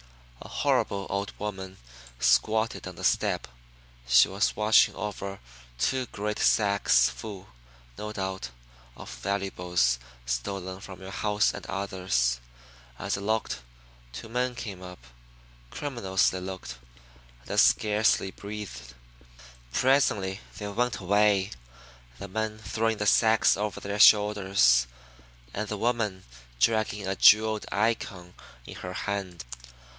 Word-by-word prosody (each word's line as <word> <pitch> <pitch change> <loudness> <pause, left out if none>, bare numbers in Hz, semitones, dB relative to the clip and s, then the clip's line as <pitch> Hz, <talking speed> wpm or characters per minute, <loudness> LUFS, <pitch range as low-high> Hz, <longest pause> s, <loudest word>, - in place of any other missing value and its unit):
A - - -9
horrible 100 -1 0
old 100 +1 -2
woman 95 -2 -6 0.4
squatted 110 - +2
on - - -8
the - - -10
step. - - +1 0.6
She - - +6
was 100 +2 0
watching 105 +1 +4
over 100 -1 -5 0.4
two 130 - 0
great 105 0 -4
sacks 100 -2 +4
full, 100 -4 -9 0.5
no 105 0 -5
doubt, 95 - -4 0.5
of - - -10
valuables 90 -10 0 0.3
stolen 95 +10 -3
from 95 -2 -11
your 95 0 -8
house 105 +2 +1
and - - -8
others. 95 -11 -1 0.6
As - - -2
I 100 - -5
looked, 110 - -1 0.5
two 65 - -8
men 125 +2 -1
came 105 -6 -7
up. 90 -1 -9 0.7
Criminals, 115 - 0
they 95 - -5
looked, 95 -9 -7 0.7
and - - -10
I - - -1
scarcely 105 -2 +3
breathed. 95 -15 -8 0.8
Presently 105 - +2 0.2
they 105 - -5
went 120 +4 -1
away, 100 0 +2 0.7
the 100 - -7
men 110 +2 -3
throwing 110 +1 -1
the 105 - -2
sacks 110 0 +4
over 105 +1 -3
their 100 +1 -4
shoulders, 100 - +5 0.7
and 105 +1 -3
the 105 - -4
woman 110 -4 -1 0.4
dragging 110 - +1
a 95 - -1
jeweled 110 +1 +5
Icon 100 -5 -1 0.3
in - - -9
her - - -6
hand. 95 -7 -4
100 Hz, 125 wpm, -27 LUFS, 95-110 Hz, 0.8 s, She